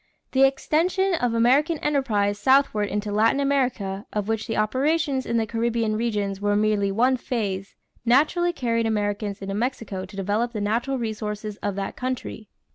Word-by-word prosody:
= - - -49
The 270 0 +6
extension 355 +8 +1
of 245 -8 0
American 275 +8 +3
enterprise 215 -9 0
southward 260 -6 +3
into 205 +1 -2
Latin 220 +6 +3
America, 250 -8 0
of 210 -1 -2
which 220 0 -2
the 225 - -2
operations 270 +5 +1
in 235 - 0
the 225 - +1
Caribbean 230 -1 0
regions 205 -4 -2
were 205 0 +1
merely 210 -1 +2
one 250 +6 +2
phase, 200 -6 -3 0.3
naturally 310 +9 +3
carried 230 -7 0
Americans 205 -1 -2
into 195 0 -4
Mexico 210 -4 -3
to 195 +1 -13
develop 210 +5 -1
the 215 - -3
natural 235 +6 0
resources 215 -2 -4
of 205 -2 -3
that 195 0 -4
country. 250 -4 -5
225 Hz, 165 wpm, -24 LUFS, 205-260 Hz, 0.3 s, The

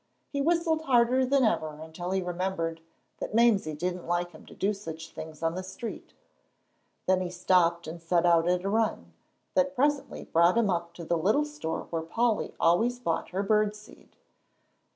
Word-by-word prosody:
He 280 - -1
whistled 330 0 +2
harder 250 0 +3
than 275 0 +3
ever 155 -9 0
until 160 +3 -6
he 190 0 0
remembered 175 -2 -2 0.4
that - - -4
Mamsie 210 -9 +3
didn't 180 +3 -3
like 175 0 0
him 155 - -15
to - - -13
do 205 +2 +1
such 160 -5 -8
things 160 0 -9
on 165 0 +1
the 185 - -4
street; 190 +5 -8 0.9
then 185 0 +3
he 180 - -2
stopped 175 -1 +2
and 165 +2 -7
set 170 +1 +1
out 170 0 +4
on 180 +1 +1
a - - +1
run, 225 0 0 0.4
that 275 0 +2
presently 285 +1 0
brought 170 +5 +3
him 220 -4 +3
up 170 -1 -3
to 170 - -8
the 170 0 0
little 215 - +2
store 295 - -4
where 165 -1 -1
Polly 225 +7 0
always 225 +9 +3
bought 170 -11 -2
her 190 +4 -2
bird 210 0 +2
seed. 210 +1 -16
185 Hz, 180 wpm, -28 LUFS, 170-230 Hz, 0.9 s, out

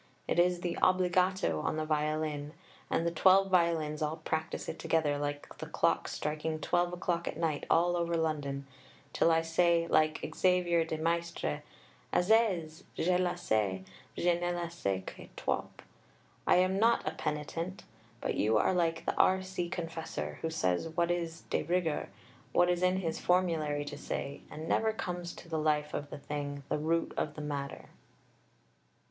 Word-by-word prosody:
It - - +1
is 175 0 +3
the 175 -1 -2
obbligato 185 - +3
on - - -1
the 155 - -1
violin, 150 -1 -1 0.4
and 165 - +1
the 170 - +1
twelve 190 +3 +5
violins 165 -4 +2
all 155 +1 -1
practise 160 0 -3
it 160 - -5
together, 150 -3 +1
like 145 0 -4
the - - -5
clocks - - +1
striking 155 +1 -2
12 175 +3 +1
o'clock 175 -1 -1
at - - -3
night 160 -3 -1
all 175 +1 +4
over 170 -1 0
London, 145 -4 -1 0.5
till - - +4
I 165 0 +3
say 170 0 +3
like 155 -1 +2
Xavier 180 -2 +3
de 160 -1 -3
Maistre, 165 - -1 0.5
Assez, 180 -5 +2
je 180 +2 +2
le 180 0 +1
sais, 105 - 0 0.3
je 175 0 +2
ne 175 0 0
le 170 -1 -4
sais 100 - -2
que - - -9
trop. - - -1 0.8
I - - +6
am 185 +2 +3
not 230 -3 +3
a - - +1
penitent; 160 +4 -4 0.4
but - - -1
you 110 +1 +2
are 145 - +3
like 165 -2 0
the - - +1
R.C. 185 -2 +2
Confessor, 165 -2 -4
who 160 - -1
says 160 - 0
what 170 +1 +1
is 165 -2 -2
de - - +2
rigueur, 170 -1 0 0.4
what 175 0 +4
is 175 0 0
in 185 0 +3
his 165 -3 -2
Formulary 160 -5 +1
to 145 0 -7
say, 140 0 -4
and 155 +1 -7
never 220 +5 +2
comes 175 -4 -4
to - - -12
the 160 -1 -2
life 150 -1 +1
of 145 - -3
the - - -6
thing, 145 -1 -5
the - - 0
root 165 +2 0
of 150 - -2
the 155 - -6
matter. 140 -2 -5
165 Hz, 170 wpm, -32 LUFS, 150-175 Hz, 0.8 s, I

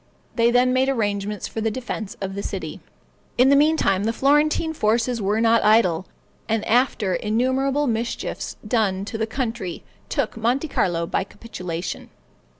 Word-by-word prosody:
They 235 -1 +4
then 250 +1 +3
made 260 +1 +2
arrangements 205 -4 -1
for 225 - -5
the 225 - +1
defense 220 -3 -5
of 195 -1 -3
the 200 - -4
city. - - -5 0.6
In 250 +2 +5
the 280 - +6
meantime, 285 -10 +3
the 225 - +2
Florentine 295 +5 +2
forces 230 -2 +1
were 205 +2 +1
not 230 0 +4
idle; 190 -5 +3 0.4
and 220 -1 0
after 235 -5 +2
innumerable 260 +8 +1
mischiefs 230 -1 -3
done 200 -4 +1
to 220 +1 -5
the 220 - 0
country 225 -7 -4 0.3
took - - -1
Monte 245 +7 0
Carlo 170 -7 0
by 190 - -1
capitulation. 180 -5 -6
225 Hz, 150 wpm, -23 LUFS, 200-255 Hz, 0.6 s, the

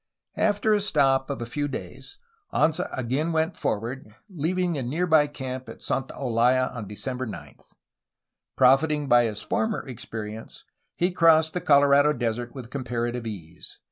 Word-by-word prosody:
After 215 0 +2
a 205 - +2
stop 140 -9 +2
of 140 -4 -3
a - - -4
few 145 +5 -2
days, 400 - -8 0.3
Anza 155 +1 +1
again 130 +6 -1
went 160 +2 0
forward, 115 0 -4 0.2
leaving 180 +2 -1
the 145 - -2
near 150 +9 -1
by 155 -3 +4
camp 130 -3 -6
at - - -11
Santa 135 0 -2
Olaya 125 0 +1
on 115 -5 -6
December 125 +5 -4
9. 110 - -9 1.0
Profiting 145 +3 +3
by 120 -2 +5
his 105 -2 -3
former 220 -8 -1
experience, 110 -3 -8 0.3
he 180 +2 +1
crossed 160 -2 +4
the 180 - -2
Colorado 145 0 +5
Desert 120 -1 -3
with 125 -3 -9
comparative 120 -3 -3
ease. 85 -6 -9
135 Hz, 150 wpm, -25 LUFS, 120-160 Hz, 1.0 s, by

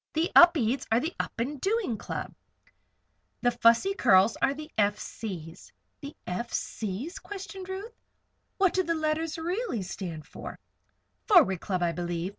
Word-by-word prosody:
The 325 +2 0
Upedes 280 -8 +6
are 225 - +4
the 320 +7 -3
Up - - -4
and 265 +3 -3
Doing 405 - 0
Club. - - -6 1.1
The 245 - +4
Fussy 235 +10 +4
Curls 190 - +4
are 270 +1 +2
the 305 +1 -9
F. 205 -1 +2
C.'s." 175 -10 -8 0.3
"The 285 0 -9
F. 235 +7 -4
C.'s?" 220 - -4
questioned 390 -1 -8
Ruth. 395 +5 -6 0.6
"What 385 -3 +3
do 375 - +2
the 335 -2 -1
letters 315 +1 -1
really 345 - -2
stand 175 -4 -6
for?" - - -9 0.7
"Forward 310 - +5
Club, 185 -3 -1
I 170 - +2
believe. 175 0 -3
270 Hz, 150 wpm, -28 LUFS, -, 1.1 s, Upedes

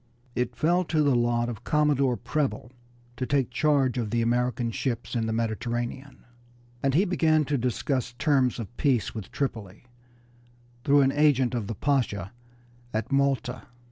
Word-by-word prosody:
It 125 0 -2
fell 175 +3 +2
to 155 -1 +1
the 140 -2 +3
lot 120 0 +1
of 115 -2 -6
Commodore 140 -4 +2
Preble 140 -4 -2 0.5
to 130 - -2
take 135 -3 +1
charge 135 -2 +2
of 110 -3 -2
the 115 +1 +1
American 120 0 0
ships 120 0 -3
in 115 -2 0
the - - -1
Mediterranean, 120 +4 -3 0.6
and 135 0 +1
he 185 +6 +4
began 160 -4 +2
to 145 - -1
discuss 125 0 -1
terms 130 -1 +2
of 115 0 -7
peace 130 -6 +1
with 110 -4 -7
Tripoli 110 -7 -4 1.0
through 145 -1 +5
an 135 0 +3
agent 140 -4 +3
of 115 -5 -2
the 115 - -4
Pasha 105 -6 -1 0.6
at 110 +3 -3
Malta. 135 -2 0
125 Hz, 155 wpm, -26 LUFS, 120-140 Hz, 1.0 s, through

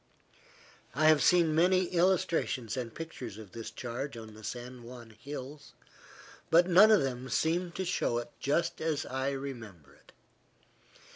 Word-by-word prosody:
I 155 +3 +2
have 155 -2 +5
seen 170 -3 +4
many 180 +3 +4
illustrations 170 - +1
and 125 -3 -4
pictures 125 -8 -8
of 105 -4 -11
this 115 +2 -7
charge 125 +2 -5
on 110 -1 -10
the 110 0 -14
San 120 +3 -7
Juan 120 -1 -11
hills, 145 +4 -9 0.8
but 170 +2 +6
none 190 +4 +7
of 215 -8 +5
them 130 -1 -4
seem 170 +8 0
to 190 - -3
show 170 -9 0
it 120 0 -5
just 170 +5 0
as 155 -3 -1
I 130 +1 -2
remember 115 - -7
it. - - -22
135 Hz, 150 wpm, -30 LUFS, 120-165 Hz, 0.8 s, none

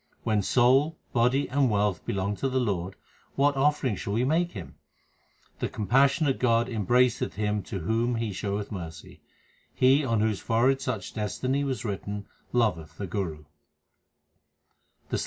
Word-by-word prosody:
When 105 -2 +1
soul, 130 +9 +3 0.2
body, 125 +4 +2
and 135 -1 +2
wealth 105 -2 0
belong 100 +1 -1
to 135 - -1
the 130 0 0
Lord, 95 -6 -2 0.4
what 140 +1 +3
offering 135 -4 +1
shall 100 +2 -4
we 115 +3 +1
make 165 +6 +1
Him? 95 -6 -8 0.9
The - - -1
compassionate 135 - +2
God 115 -2 +3
embraceth 120 +2 +1
him 105 0 -1
to 95 - -5
whom 115 +6 0
He 115 -3 -2
showeth 100 +2 -3
mercy. 80 -5 -8 0.5
He 135 +3 +4
on 115 -5 +1
whose 110 -2 +1
forehead 125 +4 +2
such 125 -6 -4
destiny 130 +7 -1
was 130 -3 -3
written 100 0 -4 0.3
loveth 105 -11 0
the 100 - -4
Guru. 85 -5 -4
115 Hz, 140 wpm, -27 LUFS, 100-130 Hz, 0.9 s, He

